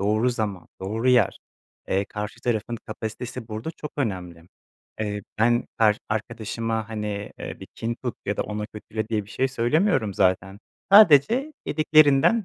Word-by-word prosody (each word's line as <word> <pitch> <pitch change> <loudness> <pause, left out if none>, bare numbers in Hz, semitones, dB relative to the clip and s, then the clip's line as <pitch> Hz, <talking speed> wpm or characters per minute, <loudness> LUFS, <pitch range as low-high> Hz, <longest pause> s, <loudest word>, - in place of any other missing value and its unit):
doğru 110 +5 +2
zaman, 105 -6 -3
doğru 110 +6 -1
yer, 125 -6 +4 0.5
eee, 100 +1 +1
karşı 105 +1 -6
tarafın 120 0 -1
kapasitesi 115 +2 -6
burada 110 +8 -4
çok 150 -2 -8
önemli. 90 - -3 0.6
Eee, 105 -1 -2 0.2
ben 120 +2 +3
kar 105 -2 +4
arkadaşıma, 110 +1 -3
hani, 105 -2 -4
eee, - - -7
bir - - -8
kin 115 +1 -3
tut 125 - -2
ya 100 - -1
da - - 0
ona 105 0 -4
kötüle 110 +1 -6
diye 105 -3 -1
bir 105 - -16
şey 130 0 0
söylemiyorum 120 - +1
zaten. 95 +1 +1 0.3
Sadece 215 - +7
dediklerinden 155 +6 +4
110 Hz, 150 wpm, -24 LUFS, 105-125 Hz, 0.6 s, Sadece